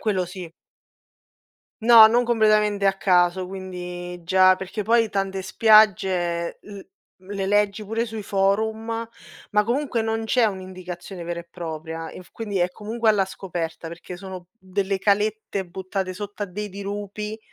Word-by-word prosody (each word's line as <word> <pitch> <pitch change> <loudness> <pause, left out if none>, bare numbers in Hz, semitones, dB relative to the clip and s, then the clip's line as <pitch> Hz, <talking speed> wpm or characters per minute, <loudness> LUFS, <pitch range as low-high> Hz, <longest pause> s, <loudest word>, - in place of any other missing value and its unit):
Quello 195 -4 0
sì. 175 -2 -9 1.3
No, 225 -1 +10
non 240 +2 +3
completamente 215 -3 +3
a 195 - +5
caso, 180 -1 +2
quindi 180 -2 -7
già 185 +2 +5
perché 190 +3 -5
poi 230 0 +3
tante 195 -1 -2
spiagge 185 -5 +3
l 200 -1 -10 0.4
le 195 +1 -5
leggi 205 +1 +2
pure 225 +3 -1
sui 220 -1 -6
forum 220 +4 0 0.4
ma 210 -1 +3
comunque 245 0 0
non 225 0 -1
c'è 240 +2 +3
un'indicazione 185 -2 -7
vera 170 0 -4
e 170 - -15
propria, 160 -1 -6
inf 185 - -12
quindi 210 -4 -3
è 175 0 +2
comunque 225 +3 -2
alla 205 -3 +4
scoperta 175 -4 -5
perché 175 +2 -9
sono 185 -1 -9
mhmm, 190 -2 -20
delle 195 0 0
calette 205 0 0
buttate 185 +1 -4
sotto 205 +2 -6
a 205 - -1
dei 205 +3 -5
dirupi 205 +2 -5
195 Hz, 145 wpm, -23 LUFS, 180-215 Hz, 1.3 s, No